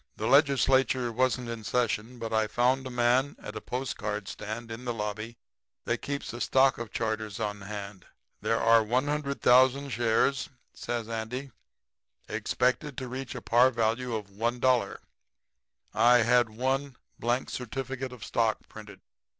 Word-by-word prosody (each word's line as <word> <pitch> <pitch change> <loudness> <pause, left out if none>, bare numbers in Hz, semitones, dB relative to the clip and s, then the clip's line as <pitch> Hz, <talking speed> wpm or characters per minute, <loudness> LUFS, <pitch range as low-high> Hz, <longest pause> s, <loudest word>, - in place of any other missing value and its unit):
'The - - -3
Legislature 135 -3 +3
wasn't 125 +1 0
in 115 -1 -5
session, 120 +1 -1
but 115 -1 -5
I 110 -1 +2
found 130 +4 +1
a - - -6
man 125 +3 +2
at - - -8
a - - -5
postcard 105 -5 -4
stand 110 +3 -6
in 115 +2 -7
the 120 -2 -3
lobby 110 +2 -4 0.5
that - - 0
kept 140 -3 -4
a 120 - -6
stock 135 -1 +3
of 115 -2 -5
charters 110 -2 -3
on 105 -2 -3
hand. 100 -2 -7 0.3
There 115 - +1
are 115 0 +5
100,000 135 +1 +2
shares,' 120 +3 +1 0.2
says 120 -2 -4
Andy, 115 +4 -4 0.8
'expected 130 +2 -1
to 130 - -4
reach 130 +1 -6
a - - -7
par 120 +2 +5
value 115 0 -1
of 105 -2 -6
$1. 120 +1 +1 1.0
I 120 +1 +6
had 120 0 +4
one 130 +4 -1 0.2
blank 120 +2 -1
certificate 130 +1 -4
of 125 -4 -9
stock 115 -2 0
printed.' 105 -3 -12
120 Hz, 145 wpm, -28 LUFS, 110-130 Hz, 1.0 s, I